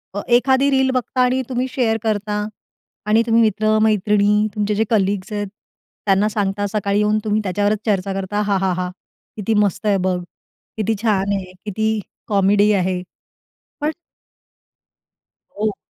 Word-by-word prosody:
अ, 205 - -2
एखादी 260 +3 +4
रील 265 -1 +3
बघता 255 0 -1
आणि 250 +1 +2
तुम्ही 255 +1 -1
शेअर 245 -4 +1
करता 210 -1 -1 0.7
आणि 215 +2 +4
तुम्ही 230 0 +4
मित्र, 215 0 +2
मैत्रिणी, 210 0 +3
तुमचे 210 0 0
जे 220 - +2
कलीग्स 200 -2 0
आहेत, 205 0 -2 0.6
त्यांना 200 +2 +3
सांगता, 205 -1 -1
सकाळी 200 0 0
येऊन 210 +1 +2
तुम्ही 215 0 0
त्याच्यावरच 205 +2 0
चर्चा 195 -2 0
करता, 195 +2 -2
"हाहाहा! 185 -2 0 0.5
किती 215 +2 -1
मस्त 205 +2 -2
आहे 205 -2 +3
बघ! 180 -1 +1 0.6
किती 220 +1 0
छान 200 -3 +1
आहे, 185 -2 -4
किती 220 +1 0 0.3
कॉमेडी 205 +1 +3
आहे." 185 -1 0 0.8
पण 300 - +1 1.7
हो. 215 0 0
210 Hz, 140 wpm, -20 LUFS, 200-220 Hz, 1.7 s, एखादी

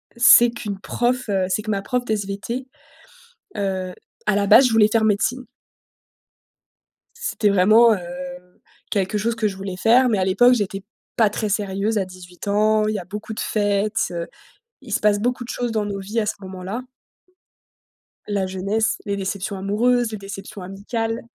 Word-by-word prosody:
c'est 240 0 +7
qu'une 210 -4 -6
prof, 245 +4 -1
heu, 190 -2 +1
c'est 190 +3 0
que 215 0 -4
ma 195 - -1
prof 250 +4 -1
de 220 - 0
SVT, 210 +5 -4 0.9
heu, 190 -2 -2 0.3
à 210 - +2
la 200 0 +1
base, 255 +6 +7
je 245 - 0
voulais 220 -2 +5
faire 220 0 +2
médecine 230 +5 +1 2.0
c'était 205 -2 +3
vraiment, 220 +5 +6
heu, 205 - -2 0.9
quelque 200 +1 0
chose 230 +2 -1
que 220 -2 0
je 195 - -4
voulais 190 -1 -6
faire, 245 +5 +4
mais 215 - +1
à 190 - +1
l'époque, 245 +7 +5
j'étais 195 -3 -3 0.3
pas 220 -3 +4
très 210 +1 -3
sérieuse 205 +1 -1
à 195 - -1
18 180 +1 -12
ans, 215 +1 +2
il 215 - -1
y - - -1
a 180 - -9
beaucoup 210 +4 -7
de - - -6
fêtes, 205 0 0
heu, 170 -1 -4 0.5
il 245 -6 -7
se - - +2
passe 210 -1 +3
beaucoup 245 +3 -1
de 240 - -11
choses 245 -1 -2
dans 215 -2 -1
nos 200 -1 -4
vies 205 +4 -2
à 215 - -1
ce - - -1
moment-là 190 +5 -6 1.4
la 200 -2 -1
jeunesse, 195 +4 -1
les 200 - -1
déceptions 195 +1 -3
amoureuses, 230 +5 +1
les 215 - -4
déceptions 195 0 -9
amicales. 225 +5 -4
210 Hz, 180 wpm, -22 LUFS, 195-225 Hz, 2.0 s, c'est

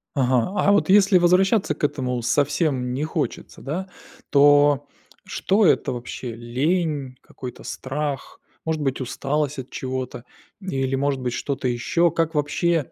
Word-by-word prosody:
Ага. 130 - +2
А 200 - +4
вот 205 - +2
если 195 -1 +6
возвращаться 185 +1 +3
к - - -13
этому 130 -4 -2
совсем 135 0 0
не 140 +4 -2
хочется, 155 -1 -4
да, 180 +7 -4 0.4
то 145 0 +5 0.4
что 200 +1 +1
это - - +3
вообще, 120 -1 -6
лень, 140 +3 -1
какой-то 125 -2 -9
страх, 140 +1 -4 0.3
может 160 -1 -1
быть 135 -2 -1
усталость 140 +3 -2
от 130 - -7
чего-то, 130 -2 -5 0.3
или 135 -8 -2
может 135 -1 0
быть 125 -1 -2
что-то 140 -1 -2
еще? 165 +8 +1
Как 165 0 -1
вообще, 155 +1 0
145 Hz, 140 wpm, -23 LUFS, 130-165 Hz, 0.4 s, если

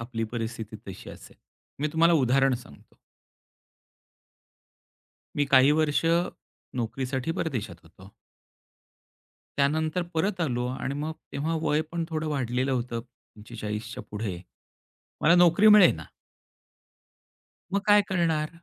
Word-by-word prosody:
आपली 115 -1 -4
परिस्थिती 115 -2 -5
तशी 95 - -9
असेल. - - -14 0.4
मी 150 - +1
तुम्हाला 165 +1 +4
उदाहरण 135 -1 +3
सांगतो. 95 - -13 2.4
मी 145 - +2
काही 135 0 +6
वर्ष 155 0 +1 0.7
नोकरीसाठी 130 +4 -2
परदेशात 115 - -3
होतो 95 +4 -16 1.5
त्यानंतर 155 +5 +1
परत 185 +3 0
आलो 125 -6 -1
आणि 135 - -3
मग 150 +2 -3 0.2
तेव्हा 155 +4 -2
वय 150 0 +2
पण 170 -1 -1
थोडं 160 -2 -3
वाढलेलं 130 -2 -1
होतं. 120 -2 -2
45च्या 110 -2 -8
पुढे 105 -4 -4 0.8
मला 170 +3 +5
नोकरी 175 +4 +5
मिळेना. 190 - +6 1.7
मग 200 - +2
काय 205 0 +6
करणार? 165 -5 +1
135 Hz, 105 wpm, -27 LUFS, 115-160 Hz, 2.4 s, काही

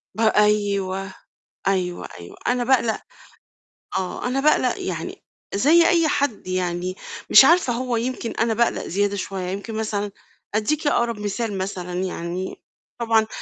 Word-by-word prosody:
ب - - -10
أيوه، 200 -3 +2 0.5
أيوه، 180 -2 0
أيوه، 85 - -11
أنا 245 0 +2
باقلق 235 -3 +2 1.0
آه، 190 +6 -3
أنا 265 +2 0
باقلق 305 +2 +2
يعني - - -5 0.3
زي 320 +10 +5
أي 335 -2 +4
حد 280 -10 -1
يعني، 185 0 -2 0.3
مش 265 - +9
عارفة 335 -6 +4
هو 245 -1 -1
يمكن 240 0 -3
أنا 225 0 0
باقلق 235 +1 0
زيادة 200 +2 0
شوية، 190 -2 -4
يمكن 200 +4 -5
مثلًا 210 -2 -2 0.4
أديكِ 295 +8 0
أقرب 235 -5 +1
مثال، 205 0 -2
مثلًا 185 -2 -4
يعني، 180 +1 -4 0.4
طبعًا 225 -2 +3
210 Hz, 135 wpm, -23 LUFS, 190-240 Hz, 1.0 s, مش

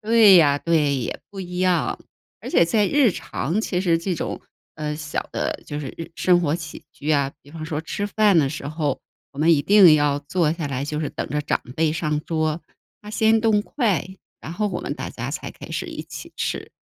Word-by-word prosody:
对 220 -2 +6
呀， 145 -4 +5
对， 150 -3 +2
也 125 - -3
不 195 - -7
一 180 -1 -6
样。 180 -3 +1 0.4
而 - - -7
且 - - +5
在 205 +5 +2
日 285 -3 +4
常 185 +7 -2
其 180 -5 -1
实 170 -3 +2
这 180 +2 -2
种， - - -4 0.4
呃， 150 -1 -3
小 150 -1 -4
的 - - -2
就 145 0 -4
是 140 - -5
日 165 - -7
生 180 -1 +4
活 155 -3 0
起 155 -2 -9
居 150 +2 -4
啊， 140 -2 +2
比 145 - -17
方 160 0 -7
说 155 -2 -3
吃 205 +5 -3
饭 205 -3 +3
的 140 -3 +3
时 140 0 -6
候， 150 -3 -2 0.3
我 140 - -13
们 165 +2 +5
一 145 -3 +3
定 195 -6 +7
要 145 -1 +2
坐 155 +2 0
下 165 -2 -4
来， 135 0 -2
就 150 +1 -3
是 150 - -2
等 - - -5
着 150 - -1
长 145 - -1 0.2
辈 155 -1 +2
上 155 -2 -1
桌。 155 0 -1 0.4
他 210 - -10
先 220 0 +3
动 220 -2 +3
筷， 210 - 0 0.3
然 160 - -7
后 210 +4 -1
我 175 -3 -4
们 - - -4
大 - - -6
家 - - -5
才 - - -5
开 - - -12
始 - - -3
一 - - -6
起 - - -9
吃。 - - -3
165 Hz, 240 characters per minute, -23 LUFS, 150-190 Hz, 0.4 s, 定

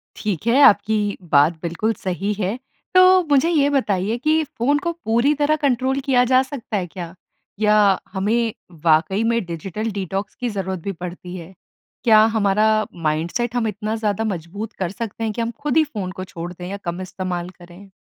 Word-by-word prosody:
ठीक 210 -2 -3
है, 255 +5 +4
आपकी 205 -2 +4
बात 145 +4 +5
बिल्कुल 180 +7 -1
सही 195 +3 -1
है। 205 +3 -2 0.4
तो 370 0 +7
मुझे 285 +4 +4
ये 290 -4 +3
बताइए 220 -6 0
कि 310 +4 +2
फ़ोन 285 +1 0
को 340 - -2
पूरी 235 +6 +3
तरह 300 +1 +3
कंट्रोल 265 0 +1
किया 250 -2 +4
जा 255 +1 +4
सकता 255 -6 -5
है 180 -2 -2
क्या? 170 -1 -8 0.5
या 210 -2 +4
हमें 220 +3 0 0.3
वाक़ई 165 +7 +3
में 230 -1 +1
डिजिटल 195 +6 -4
डिटॉक्स 195 0 -4
की 245 -1 -3
ज़रूरत 190 -3 -3
भी 200 - -2
पड़ती 180 0 -8
है? 175 +1 -9 0.5
क्या 220 -3 +6
हमारा 210 +1 +3 0.4
माइंडसेट 170 +11 -1
हम 230 -2 +1
इतना 215 +2 -3
ज़्यादा 220 -1 -1
मजबूत 205 +2 -5
कर 180 -2 -1
सकते 225 +1 -5
हैं? 220 - 0
कि 235 - -3
हम 230 0 -1
खुद 295 +1 +1
ही 315 - +6
फ़ोन 205 -11 -5
को 185 - -7
छोड़ 175 -1 -7
दें 180 0 -8
या 200 - -4
कम 175 +2 -3
इस्तेमाल 180 -1 -4
करें? 180 +3 -14
210 Hz, 185 wpm, -21 LUFS, 185-240 Hz, 0.5 s, तो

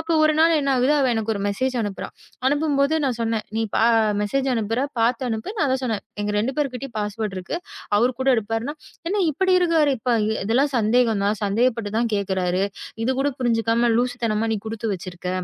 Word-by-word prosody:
அப்ப 320 +1 -2
ஒரு 310 0 +5
நாள் 325 +1 +5
என்ன 275 - -2
ஆகுது, 255 +4 +3
அவ 270 - +3
எனக்கு 225 -1 -1
ஒரு 200 - -3
மெசேஜ் 255 +6 -1
அனுப்புறா. 205 -3 -4 0.4
அனுப்பும்போது 290 +1 +2
நான் 250 -4 0
சொன்னேன். 225 -1 -1
"நீ 225 - +1 0.6
மெசேஜ் 265 +6 0
அனுப்புற, 225 +1 -1 0.2
பாத்து 235 +2 +2
அனுப்பு." 220 - -3
நான் 290 -8 +1
தான் 260 - 0
சொன்னேன். 225 -5 -2 0.2
"எங்க 205 0 -1
2 225 +6 0
பேருகிட்டயும் 270 -4 -3
பாஸ்வேர்ட் 210 -1 -3
இருக்கு. 185 - -4 0.4
அவர் 245 +4 +3
கூட 265 - +1
எடுப்பாருன்னா 225 +6 -2 0.3
என்ன 400 0 +1
இப்டி 375 +5 +2
இருக்காரு? 320 -5 +3 0.5
இதெல்லாம் 260 +7 +2
சந்தேகம்தான். 220 -2 +2
சந்தேகப்பட்டுதான் 225 +1 0
கேக்குறாரு. 190 -2 0 0.4
இது 260 - +1
கூடப் 280 -1 -1
புரிஞ்சுக்காம 230 0 +2
லூசுத்தனமா 230 -3 0
நீ 215 - -1
குடுத்து 225 0 -3
வச்சிருக்க." 180 0 -7
230 Hz, 165 wpm, -23 LUFS, 215-270 Hz, 0.6 s, ஒரு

